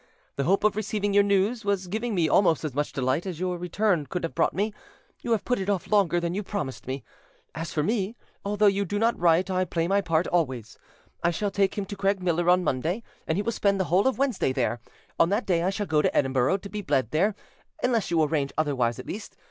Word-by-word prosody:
The 140 - -1
hope 195 +4 +2
of 215 -1 +3
receiving 205 -1 -1
your 205 - +6
news 200 +4 +1
was 200 -2 0
giving 220 +4 -2
me 170 -3 +2
almost 165 0 +3
as 150 - -3
much 145 +2 -1
delight 130 +7 -1
as 175 -4 -5
your 180 -1 -2
return 180 -3 0
could 180 +7 -4
have 165 - -3
brought 165 - +1
me: 210 +2 0 0.5
you - - -6
have 220 -3 +1
put 250 -2 0
it 190 +1 -3
off 200 -1 -1
longer 190 -5 +3
than 170 0 -2
you 200 - -1
promised 185 -13 -5
me. 130 +1 -4 0.5
As 165 +1 -5
for 150 - 0
me, 210 +2 -1 0.3
although 210 +1 +1
you 200 0 +3
do 200 +2 -3
not 230 +2 +2
write, 175 +2 +3
I 185 0 +1
play 170 -2 -1
my 200 +2 +2
part 165 -2 +1
always. 130 -10 -2 0.4
I 170 - +4
shall 200 +4 -1
take 195 0 +1
him 200 - -1
to 205 - -7
Craigmiller 185 -3 +1
on 180 0 +4
Monday, 165 - -1 0.2
and 160 - 0
he 205 - 0
will 230 - 0
spend 200 -3 +1
the - - +3
whole 195 +7 +4
of 265 - +1
Wednesday 260 - +1
there. 120 -2 -1 0.4
On 165 - +5
that 205 +5 0
day 175 -3 +2
I 180 - +1
shall 205 +1 -2
go 155 -4 +2
to - - 0
Edinburgh 135 +6 +2
to 200 0 -10
be 210 +2 -4
bled 130 - 0
there, 195 +7 +2 0.5
unless 235 -4 +1
you 165 -2 +3
arrange 145 -2 0
otherwise 130 -6 +1
at - - -8
least. 210 +2 -7
185 Hz, 240 wpm, -26 LUFS, 160-205 Hz, 0.5 s, your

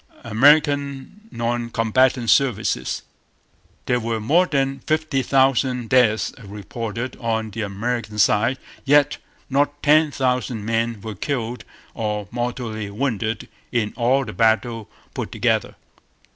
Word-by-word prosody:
American 140 - +2
Non 120 - -2
Combatant 120 +2 +2
Services. 115 -1 +1 0.8
There 125 - +1
were 115 -1 -2
more 165 +12 +3
than 135 -2 0
fifty 155 -3 0
thousand 130 -2 +2
deaths 115 -4 +3
reported 115 +4 -5
on 110 -2 -2
the 115 +3 -5
American 105 +2 -3
side; 105 +5 +3 0.3
yet 145 +1 +3 0.3
not 145 +1 0
ten 155 +1 +5
thousand 125 -5 -1
men 115 -1 -1
were 110 0 -6
killed 120 +1 -3 0.3
or 105 -2 -3
mortally 120 -3 -3
wounded 115 -1 -2 0.2
in 110 -3 0
all 130 +3 +2
the 105 - -7
battles 115 0 +1 0.3
put - - -4
together. - - 0
120 Hz, 115 wpm, -22 LUFS, 110-135 Hz, 0.8 s, ten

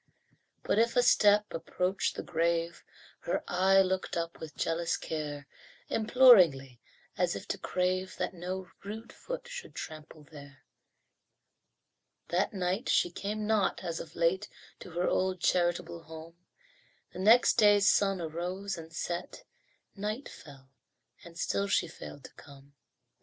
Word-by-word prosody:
But 210 - +1
if 235 +1 +2
a 245 - +4
step 210 -3 +5
approached 180 +3 -1
the - - -5
grave 170 0 -1 0.4
Her 170 - -2
eye 190 +2 +4
looked 185 -1 -2
up 170 0 -4
with 155 -2 -9
jealous 165 0 0
care, 150 -3 -5 0.4
Imploringly, 185 - +5 0.4
as - - +1
if - - -7
to - - -2
crave 185 +1 -1
That - - -2
no 180 +1 -6
rude 220 +3 -8
foot - - -7
should - - -8
trample 155 -1 -9
there. 140 -3 -14 1.7
That 180 +3 +1
night 190 +4 -2
she 175 - +3
came 210 +4 -4
not, 215 -3 +1
as 170 -2 -3
of 160 - -9
late, 175 +4 +1 0.3
To - - -10
her 175 +1 -1
old, 185 0 0
charitable 175 -1 0
home; 160 +1 -10 0.8
The - - -8
next 225 +6 +5
day's 205 -1 +5
sun 195 -2 +3
arose 175 +4 -4
and 160 0 -11
set, 175 - -5 0.5
Night 215 +6 -4
fell 135 -3 -14 0.5
and 170 0 -13
still 200 +4 -1
she 185 - +1
failed 145 -3 -10
to - - -12
come. 140 0 -16
180 Hz, 140 wpm, -30 LUFS, 165-200 Hz, 1.7 s, step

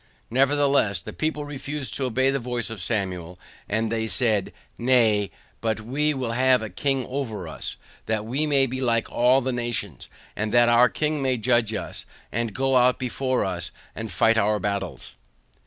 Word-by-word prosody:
NEVERTHELESS 135 -7 +3
THE - - -7
PEOPLE 155 -1 -2
REFUSED 145 -1 -5
TO 135 - -1
OBEY 130 +2 +2
THE 140 - 0
VOICE 120 -3 -3
OF 110 -4 -6
SAMUEL, 90 -5 -3 0.3
AND 110 +1 0
THEY 110 -1 -1
SAID, 110 -4 +1 0.3
NAY, 115 -5 +3 0.3
BUT 110 -1 -1
WE 145 +7 0
WILL 125 -3 -2
HAVE 130 0 +3
A 110 - -4
KING 135 +5 0
OVER 115 -9 -4
US, 80 - -6 0.3
THAT 110 -1 -1
WE 135 +7 -1
MAY 140 -2 +4
BE 130 +1 -4
LIKE 115 -3 +1
ALL 125 +3 +4
THE 130 +1 -1
NATIONS, 120 - -3 0.3
AND 105 0 -2
THAT 120 0 +5
OUR 120 +1 +6
KING 150 +1 -1
MAY 130 -2 +1
JUDGE 115 -1 +2
US, - - -4 0.2
AND 115 -2 -2
GO 135 0 +2
OUT 125 0 +4
BEFORE 130 0 -1
US, 90 -4 -3 0.2
AND 110 -2 -6
FIGHT 115 +6 +3
OUR 105 0 +2
BATTLES. 100 -1 -3
120 Hz, 175 wpm, -25 LUFS, 110-130 Hz, 0.3 s, OUR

